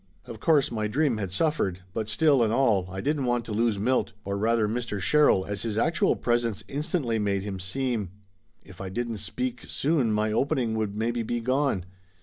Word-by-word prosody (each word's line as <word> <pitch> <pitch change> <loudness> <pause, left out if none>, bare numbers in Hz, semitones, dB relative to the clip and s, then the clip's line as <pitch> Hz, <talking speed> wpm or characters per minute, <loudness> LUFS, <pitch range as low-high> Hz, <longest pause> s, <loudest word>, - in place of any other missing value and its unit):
Of 115 - -9
course 150 +2 +3
my 110 -2 -1
dream 135 +1 +1
had 100 -4 -3
suffered, 95 - 0
but 110 -1 -3
still 140 +4 +3
and 110 -2 +2
all 110 -7 +2
I 95 +1 -5
didn't 145 -1 0
want 120 -1 0
to 115 - -7
lose 110 0 +1
Milt, 125 +6 +1
or 100 0 -2
rather 110 +1 +2
Mr. 115 -2 -3
Sherrill, 145 -4 +4
as 100 0 -3
his 110 -2 -2
actual 160 +8 +2
presence 120 -3 0
instantly 140 -5 -1
made 100 -2 0
him 100 -2 -5
seem. 110 +1 -2 0.6
If 95 -2 -12
I 95 - -4
didn't 115 +3 -3
speak 120 +4 -3
soon 140 -6 +1
my 105 0 +1
opening 130 -1 +1
would 110 -2 -2
maybe 115 +2 -1
be 120 +1 -2
gone. 130 -5 0
115 Hz, 190 wpm, -27 LUFS, 105-130 Hz, 0.6 s, Sherrill